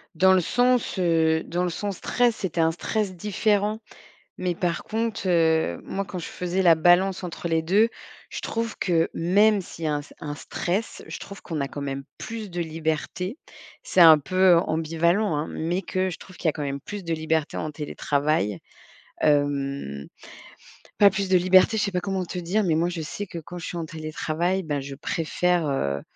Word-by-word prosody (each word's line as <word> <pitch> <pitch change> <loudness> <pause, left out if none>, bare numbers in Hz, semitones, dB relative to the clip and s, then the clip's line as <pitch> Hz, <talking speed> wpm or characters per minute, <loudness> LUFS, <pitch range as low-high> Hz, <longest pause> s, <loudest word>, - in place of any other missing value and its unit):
Dans 190 +3 +5
le 185 - +4
sens, 245 +3 +1
heu, 160 -2 +2
dans 175 +1 -2
le 180 - 0
sens 195 +3 -4
stress, 245 -2 +1
c'était 170 -3 -1
un 160 0 +3
stress 195 +3 -2
différent. 210 +3 0 0.6
Mais 180 -1 -1
par 170 -1 -1
contre, 225 -2 -2
heu, 160 - +2
moi 195 +1 -3
quand 190 - -7
je 170 - -5
faisais 180 +1 -2
la 170 -2 +7
balance 180 +4 +3
entre 175 -1 -5
les 165 -1 +1
2, 200 +8 +3 0.4
je - - -5
trouve 230 0 -3
que 165 -3 +2
même 200 +4 +3
s'il 165 -2 -8
y - - +1
a 150 - +1
un 145 - -4 0.2
un 145 -1 -4
stress, 185 +8 -3
je - - -6
trouve 200 - -10
qu'on 155 -4 -3
a 140 - -1
quand 145 - -7
même 135 -1 -4
plus 220 -2 -6
de 175 0 -5
liberté. 160 - -3 0.5
C'est 185 - +3
un 160 -2 +10
peu 185 +3 +4
ambivalent 165 +4 +1
hein, 150 +2 -2
mais 175 +4 -2
que 185 0 -1
je 180 - -6
trouve 185 - -14
qu'il 170 - -2
y - - +6
a - - +2
quand 150 -1 -5
même 140 0 -3
plus 205 -1 -7
de 165 -1 -2
liberté 160 -1 -1
en 155 - -3
télétravail. 145 - -1 0.6
Hem, 140 - 0 0.9
pas 200 -1 +7
plus 195 0 -2
de 185 - +5
liberté, 185 +4 +5
je 215 - +1
sais 200 - -2
pas 180 - 0
comment 190 0 -2
te 180 +1 -6
dire, 190 +5 0
mais 170 -4 +2
moi 170 +2 +2
je 175 -2 -4
sais 205 +7 -5
que 170 - -6
quand 170 +3 -8
je 170 - -6
suis - - -5
en 165 - -3
télétravail, 160 +3 -2
bah 145 -3 -2
je 135 0 -7
préfère, 165 +2 0
heu, 70 - -1
175 Hz, 200 wpm, -25 LUFS, 155-190 Hz, 0.9 s, un